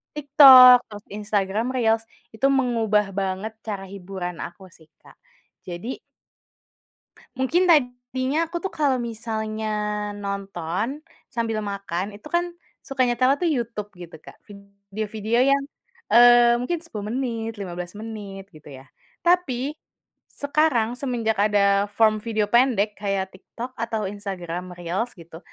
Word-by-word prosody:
TikTok, 265 -4 +9
terus 205 -1 -10
Instagram 210 +3 -1
Reels, 225 -2 +2 0.3
itu 220 +5 +1
mengubah 230 -6 +1
banget 195 +2 -3
cara 205 -3 -4
hiburan 185 -2 -6
aku 190 +2 -10
sih, 160 -2 -20 0.2
Kak, - - -18 0.5
jadi 185 +9 -6 1.4
Mungkin 340 +8 +2
tadinya 260 +1 +1
aku 345 +3 -5
tuh 385 - -3
kalau 285 -4 +1
misalnya 220 -2 -4 0.6
nonton 200 - -4 0.3
sambil 225 -2 -1
makan, 200 -1 -4
itu 210 +8 -12
kan 345 - +2 0.3
suka 270 -1 -1
nyetelnya 255 +2 +3
tuh 340 - +2
YouTube 230 -4 -4
gitu, 170 -2 -10
Kak, - - -14 0.5
video-video 215 +3 -1
yang, 280 - +4 0.5
eee, 240 0 +7
mungkin 330 +8 -2
10 215 -11 -7
menit, 230 -3 -3
15 180 -2 -6
menit, 205 -3 -8
gitu 150 -1 -14
ya. 135 0 -12 0.3
Tapi, 300 -6 +1 0.6
sekarang 285 -6 +1
semenjak 235 -5 -1
ada 200 -1 +3
form 215 0 +3
video 220 -2 0
pendek 235 -4 +3
kayak 195 -2 -2
TikTok 235 +6 -9
atau 225 -2 -2
Instagram 185 -3 -6
Reels 180 +8 -3
gitu, 165 -2 -12
220 Hz, 125 wpm, -23 LUFS, 200-250 Hz, 1.4 s, TikTok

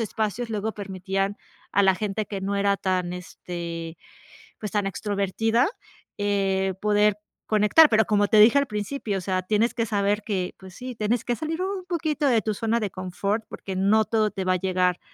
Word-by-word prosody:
espacios 225 +1 -2
luego 215 0 -2
permitían, 195 0 -3 0.4
a 200 - +4
la 190 -1 +5
gente 210 +1 -2
que 195 -1 -5
no 200 +1 -2
era 200 0 +2
tan 185 -2 -1
este, 170 -2 -6 0.6
pues 210 - -5
tan 205 -1 +1
extrovertida, 210 - 0 0.5
eh, 195 -2 0
poder 210 0 +3 0.3
conectar, 215 +9 +6
pero 220 -1 +4
como 205 -1 +2
te 215 - +5
dije 220 +5 +7
al 280 - 0
principio, 210 0 -3
o 190 - -4
sea, 185 0 -1
tienes 215 +5 +1
que 230 -2 -1
saber 205 0 0
que 190 -5 -2
pues 190 -1 -12
sí, 255 0 -7
tienes 220 +2 -1
que 240 - 0
salir 320 +3 -3
un 380 0 -2
poquito 315 -4 -1
de 235 -4 +3
tu 215 +1 -1
zona 225 +3 0
de 210 - -1
confort 185 +4 -2
porque 190 - -6
no 210 +3 +3
todo 215 -1 +1
te 195 -2 -4
va 185 - +3
a - - +1
llegar 180 -1 +1
205 Hz, 190 wpm, -25 LUFS, 190-220 Hz, 0.6 s, dije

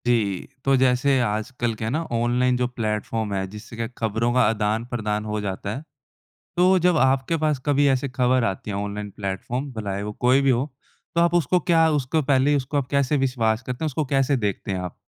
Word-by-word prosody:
जी, 105 -6 +1 0.2
तो 135 0 +4
जैसे 130 +1 +3
आजकल 115 +2 -1
क्या 110 0 -4
है - - -1
ना 155 +5 0
ऑनलाइन 120 +2 +2
जो 125 0 +1
प्लेटफॉर्म 110 -2 -2
है, 95 -1 -1
जिससे 105 +4 -10
क्या 115 0 -3
खबरों 115 +1 0
का 125 - +4
आदान-प्रदान 110 0 -1
हो 105 0 -2
जाता 100 +1 -4
है। 135 - -6 0.8
तो 185 +2 +5
जब 180 0 +3
आपके 130 +5 +2
पास 150 -3 +2
कभी 145 0 +3
ऐसी 135 +1 +1
खबर 125 0 +2
आती 100 0 -3
है 100 - -3
ऑनलाइन 105 0 -4
प्लेटफॉर्म 105 +8 -3
भलाए 100 -3 -4
वो 105 +1 -4
कोई 130 +2 +5
भी 135 -1 +3
हो, 125 +2 +1 0.5
तो 170 - +3
आप 170 0 +3
उसको 175 +1 +2
क्या 165 -1 +3
उसको 145 +5 0
पहले 135 +2 +3
ही 145 - +3
उसको 140 +2 -2
आप 135 - -1
कैसे 140 +1 +2
विश्वास 115 -3 0
करते 125 +5 -4
हैं? - - +1
उसको 155 +1 -1
कैसे 135 +1 +3
देखते 105 -4 -2
हैं 95 - -2
आप? 90 -1 -6
125 Hz, 210 wpm, -23 LUFS, 105-135 Hz, 0.8 s, तो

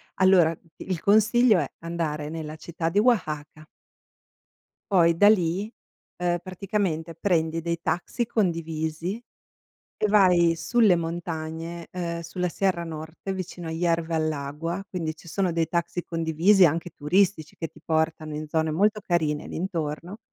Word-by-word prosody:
Allora, 185 -4 +5
d 165 - -29 0.2
il 180 -4 -2
consiglio 215 +1 +5
è: 145 - -1
andare 160 -3 -3
nella 155 -1 -6
città 165 +1 -4
di 200 - +2
Oaxaca 155 -9 0 1.2
poi 170 -3 +5
da 205 +5 +6
lì, 195 +1 +1 0.5
ehm, 175 0 +1
praticamente, 185 -4 -2
prendi 165 -2 0
dei 170 0 -2
taxi 210 +9 -1
condivisi 165 -2 -2 0.8
e 215 - +3
vai 180 -5 +5
sulle 220 0 +4
montagne, 165 0 -5
ehm, 170 -2 -3
sulla 180 +2 -3
Sierra 180 -1 0
Nord, 160 0 -7
che 195 - -4
è 190 - -1
vicino 180 -2 -6
a - - -3
Hierve 165 0 0
el 155 -1 +1
Agua, 150 +6 -4
quindi 165 -4 -3
ci 160 - -17
sono 190 +2 0
dei 165 -1 +1
taxi 170 +1 -2
condivisi 165 +4 +3
anche 170 +2 +1
turistici 175 +2 +1
che 165 - -3
ti 155 - -18
portano 160 -1 -1
in 155 0 -5
zone 160 0 0
molto 210 +6 +2
carine 155 -3 0
lì - - -6
intorno; 170 +1 -4
170 Hz, 150 wpm, -25 LUFS, 160-185 Hz, 1.2 s, da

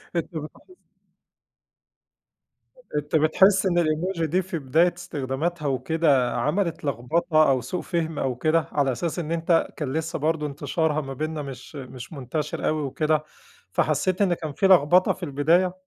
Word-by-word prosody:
أنت 170 0 -3
بتحس 155 - -8 2.2
أنت 150 +1 -2
بتحس 190 +5 +4
إن 175 -2 +3
الemoji 165 +3 -1
دي 175 +4 +1
في 185 -3 -5
بداية 160 +6 +2
استخداماتها 150 0 -3
وكده 140 -2 +2
عملت 165 +8 -1
لغبطة 155 +4 +2
أو 130 -2 +2
سوء 180 - -4
فهم 165 -3 -2
أو 130 -2 -1
كده، 155 +4 +1
على 140 -2 +1
أساس 170 +7 -3
إن 160 -1 -4
أنت 165 0 +2
كان 145 -3 -3
لسه 160 +1 -2
برضه 155 0 0
انتشارها 150 +2 -1
ما 135 -1 -6
بيننا 155 +3 -3
مش 135 +1 -9
مش 130 0 -9
منتشر 145 +2 -3
أوي 155 0 0
وكده، 155 +2 0 0.5
فحسيت 155 - +1
إن 185 -3 +3
كان 155 -3 -5
في 195 - +2
لغبطة 180 0 +5
في 185 - -12
البداية؟ 170 +5 +2
155 Hz, 150 wpm, -24 LUFS, 140-170 Hz, 2.2 s, لغبطة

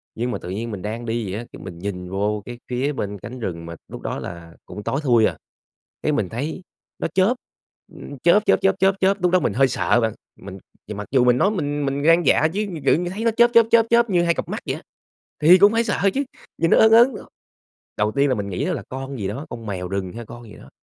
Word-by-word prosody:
Nhưng 120 +2 -2
mà - - -2
tự 90 - -9
nhiên 110 +5 -4
mình 100 -3 -6
đang 110 +4 -5
đi 115 -3 -3
vậy 100 - -3
á, 120 - -7
cái - - -10
mình 90 -3 -9
nhìn 90 -1 -5
vô 105 +2 -1
cái 120 -1 -8
phía 130 +4 -1
bên 100 -6 -4
cánh 115 +7 -9
rừng 85 -7 -5
mà 85 0 -7
lúc - - -9
đó - - -4
là 85 -1 -9
cũng 105 - -9
tối 135 - -1
thui 120 -5 +4
à, - - -1 0.7
cái 155 - +1
mình 110 -11 -1
thấy 145 +10 -4 0.4
nó - - -1
chớp, 190 +5 +3 0.6
ưm, 140 - -10
chớp, 200 +5 +4
chớp, - - +3
chớp, 195 0 +2
chớp, 195 0 +3
chớp. 195 +1 +2
Lúc 180 - +3
đó 185 - +4
mình - - -1
hơi 135 +2 +4
sợ 120 -1 +1
bạn, 110 -1 0 0.3
mình 95 0 -9 0.4
mặc 105 0 -6
dù 130 -2 +4
mình 125 0 +4
nói 200 - +3
mình 145 -7 -2
mình 140 +1 -2
gan 165 +3 +4
dạ 155 - +4
chứ, 210 +2 -1 0.2
tự - - +5
như 175 +1 -2
thấy 200 +5 -5
nó 230 - +4
chớp, 235 +2 +4
chớp, 230 -1 +7
chớp, 230 -1 +5
chớp 235 0 +4
như 175 -3 +2
hai 170 0 +2
cặp - - -5
mắt - - -3
vậy - - -1
á, - - -10 0.6
thì 170 +4 +8
cũng 200 +2 +6
phải 230 +1 +2
sợ 200 -3 +1
chứ, 280 - +1 0.3
nhìn 165 0 +1
nó - - +6
ớn 220 - +6
ớn. 235 +4 +6 0.8
Đầu 105 0 0
tiên 140 +4 +2
là 130 - +2
mình 100 -3 -4
nghĩ 90 - -2
đó - - 0
là - - -4
con 135 +1 -6
gì 100 -3 -3
đó, 135 +10 -5
con 115 -2 -8
mèo 90 -3 -4
rừng 95 -1 -3
hay 115 0 -8
con 120 +2 -11
gì 105 - -13
đó, - - -15
130 Hz, 270 wpm, -22 LUFS, -, 0.8 s, thì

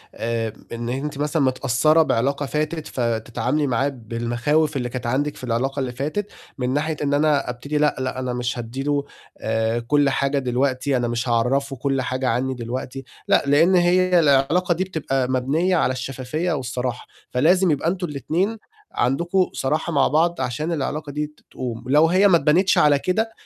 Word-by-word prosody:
آآ، 115 -1 -2 0.2
إن 120 0 -4
أنتِ 140 +3 -3
مثلًا 150 +2 0
متأثّرة 130 +4 +3
بعلاقة 140 +3 0
فاتت، 155 +2 -2
فتتعاملي 120 +4 -1
معاه 130 +3 +1
بالمخاوف 120 +5 -1
اللي 125 -1 -2
كانت 125 0 -5
عندِك 145 +4 0
في - - -13
العلاقة 130 +3 -1
اللي 130 -2 -2
فاتت 155 +11 -3 0.3
من 125 -1 -1
ناحية 155 +2 -1
إن 145 0 0
أنا 145 -2 +2
أبتدي 140 +5 -3
لأ، 150 0 +2
لأ، 130 0 -3
أنا 125 -1 -2
مش 125 0 -2
هادّي 120 +3 -5
له 145 0 0 0.3
آآ، 110 +1 -1
كل 145 +4 +2
حاجة 140 +1 0
دلوقتي، 130 +1 0
أنا 120 -1 0
مش 120 +1 -2
هاعرّفه 135 +4 +1
كل 135 +1 -1
حاجة 130 0 -2
عنّي 130 +3 0
دلوقتي. 125 +2 -5 0.2
لأ، - - +4
لإن 165 +7 +4
هي 180 0 +4
العلاقة 160 +4 +3
دي 180 - -1
بتبقى 135 -8 -2
مبنيّة 145 +8 +1
على 130 - +2
الشفافية 135 +6 -3
والصراحة، 125 -3 -3 0.2
فلازم 175 +8 +3
يبقى 150 +2 0
أنتم 180 0 -2
الاتنين 170 - -1 0.3
عندكم 170 +9 +1
صراحة 155 +5 -1
مع 140 -2 +4
بعض، 165 -1 +1
عشان 130 +6 -2
العلاقة 150 -1 -3
دي 150 +1 -2
ت 150 - -24
تقوم، 120 -3 -5
ولو 150 +5 +4
هي 185 +4 +4
ما 175 - +6
أتبنتش 170 +6 +3
على 145 -2 +5
كده، 220 +8 0
140 Hz, 175 wpm, -22 LUFS, 125-155 Hz, 0.3 s, ما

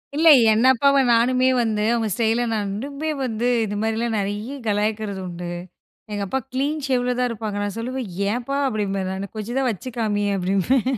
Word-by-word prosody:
இல்ல. 325 +2 +3 0.2
என் 225 +4 +3
அப்பாவ 275 +2 +3 0.2
நானுமே 255 +2 +3
வந்து, 215 -2 0
அவங்க 225 -2 0
ஸ்டைல 230 +1 +1
நான் 205 -2 -1
இன்னுமே 280 +7 -4 0.2
வந்து, 235 0 -1 0.2
இது 205 0 -4
மாரிலாம் 225 0 0
நறைய 210 +7 -3
கலாய்க்கிறது 210 -1 -1
உண்டு. 175 0 -6 0.6
எங்க 205 -1 -2
அப்பா 265 - -1
கிளீன் 290 +3 -1
ஷேவ்ல 250 -1 +1
தான் 250 - +2
இருப்பாங்க. 215 -2 -4
நான் 205 0 -3
சொல்லுவேன், 250 -2 -4 0.2
"ஏன்பா" 250 +4 -2
அப்டிம்பேன் 195 -4 -2
நானு. 190 0 -5
"கொஞ்சம் 235 +5 -4
தான் 260 -2 +1
வச்சு 245 +6 -7
காமியேன்" 205 -2 0
அப்டிம்பேன். 195 +7 +1
225 Hz, 170 wpm, -22 LUFS, 205-255 Hz, 0.6 s, இல்ல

